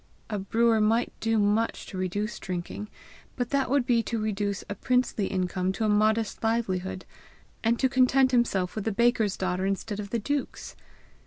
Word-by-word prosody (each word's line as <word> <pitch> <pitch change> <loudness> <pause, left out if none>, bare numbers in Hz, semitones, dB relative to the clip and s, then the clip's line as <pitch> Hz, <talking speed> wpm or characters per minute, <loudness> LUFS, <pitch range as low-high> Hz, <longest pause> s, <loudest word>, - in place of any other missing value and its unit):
A 210 - -1
brewer 225 +3 +2
might 225 +3 +2
do 225 0 +1
much 210 +2 +1
to - - -9
reduce 205 +4 -2
drinking; 185 +3 -5 0.5
but 245 -2 -3
that 280 -2 +1
would 275 -2 +2
be 240 -3 +3
to 230 0 -3
reduce 205 -2 -2
a - - -3
princely 250 -2 0
income 185 0 -1
to 220 - -1
a - - +2
modest 215 +1 +2
livelihood, 190 -5 -1 0.6
and 230 +1 +2
to 265 - +3
content 260 0 +4
himself 205 -7 +1
with 215 - -4
the 225 - +1
baker's 225 -2 +2
daughter 185 0 -1
instead 200 +1 -3
of 200 -1 -5
the 235 - 0
duke's! 285 +6 -3
215 Hz, 175 wpm, -27 LUFS, 195-235 Hz, 0.6 s, content